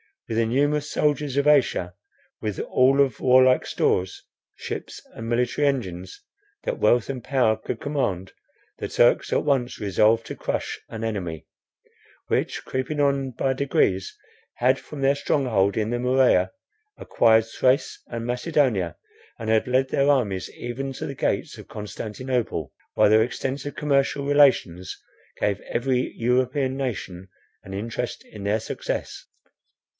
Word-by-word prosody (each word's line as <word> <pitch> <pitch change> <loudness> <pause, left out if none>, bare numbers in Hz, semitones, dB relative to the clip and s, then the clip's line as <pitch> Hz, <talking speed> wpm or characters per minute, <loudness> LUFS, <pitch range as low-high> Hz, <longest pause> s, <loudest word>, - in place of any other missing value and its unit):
With 115 - -3
the 115 - +3
numerous 145 +5 +1
soldiers 145 -2 0
of 140 - +2
Asia, 130 -11 +3 0.5
with 105 -3 -3
all 135 +2 +3
of 135 -4 +1
warlike 130 0 +5
stores, 90 0 0 0.3
ships, - - -6
and 115 - -7
military 125 +4 +1
engines, 95 -10 -3 0.4
that - - -3
wealth 120 0 +3
and 130 -3 -4
power 125 -6 +2
could 110 +1 -6
command, 100 -11 -2 0.5
the - - -3
Turks - - +3
at - - +2
once 135 -4 0
resolved 110 +3 +2
to - - -6
crush - - -3
an 115 0 -6
enemy, 90 -8 -4 0.8
which - - -1
creeping 130 +3 -3
on 140 -2 +1
by 130 +2 0
degrees, 115 -8 0 0.4
had 130 +2 +2
from 150 -2 -9
their 135 +1 +3
stronghold 115 -9 +1
in 110 0 0
the 120 - -1
Morea, 125 -7 +3 0.5
acquired 110 -1 +3
Thrace 130 +4 0
and 115 -1 -5
Macedonia, 125 - 0 0.4
and 110 - -5
had 110 +1 +2
led 130 +1 +2
their 140 +1 +2
armies 105 -10 +1
even 135 +3 -5
to - - -6
the 140 - -4
gates - - -2
of - - -11
Constantinople, 110 - -4 0.2
while - - +4
their 110 +1 +6
extensive 135 +4 -3
commercial 140 -2 +1
relations 130 -11 +3 0.4
gave 100 -1 0
every 125 +1 0
European 130 +3 0
nation 95 -8 -4 0.4
an 95 - -9
interest 115 +4 -4
in 100 -2 -10
their 105 +2 +1
success. - - -5
125 Hz, 140 wpm, -24 LUFS, 110-135 Hz, 0.8 s, their